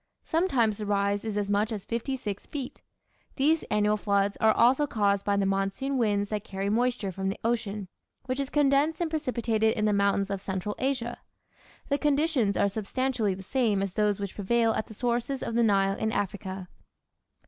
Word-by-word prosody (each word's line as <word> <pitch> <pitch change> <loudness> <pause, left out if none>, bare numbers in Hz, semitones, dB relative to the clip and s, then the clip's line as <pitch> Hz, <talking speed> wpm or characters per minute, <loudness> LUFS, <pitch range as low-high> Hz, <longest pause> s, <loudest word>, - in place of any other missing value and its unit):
Sometimes 265 - +1
the 210 - -4
rise 200 0 +1
is 215 -2 -3
as 205 -1 0
much 205 +2 +1
as 210 -4 -5
fifty 235 +4 -2
six 205 -5 -5
feet. 275 -4 -6 0.5
These 305 +4 +3
annual 210 0 +2
floods 200 -1 +1
are 220 - +6
also 255 +7 +4
caused 200 -4 +1
by 200 -1 +1
the 200 - +2
monsoon 195 +8 -1
winds 205 -4 +1
that 210 -1 -2
carry 195 +1 -3
moisture 240 -3 0
from 190 +1 -2
the 195 - -3
ocean, 215 -4 -1 0.4
which 260 +1 -2
is 275 -1 -2
condensed 290 +2 +2
and 340 -2 -1
precipitated 235 -7 0
in 215 - +1
the 210 - +3
mountains 200 0 +1
of 195 -1 -3
central 190 +1 -3
Asia. 255 -3 -1 0.7
The 280 0 +1
conditions 290 -7 +2
are - - +3
substantially 220 +1 -1
the 190 - -9
same 215 -3 +1
as 195 -2 -3
those 210 -1 +1
which 200 -2 -4
prevail 225 +3 +1
at 220 - -2
the 220 - -11
sources 245 +3 -1
of - - -3
the 235 - +2
Nile 195 -3 +3
in 220 - 0
Africa. 190 -2 -3
215 Hz, 190 wpm, -28 LUFS, 200-255 Hz, 0.7 s, are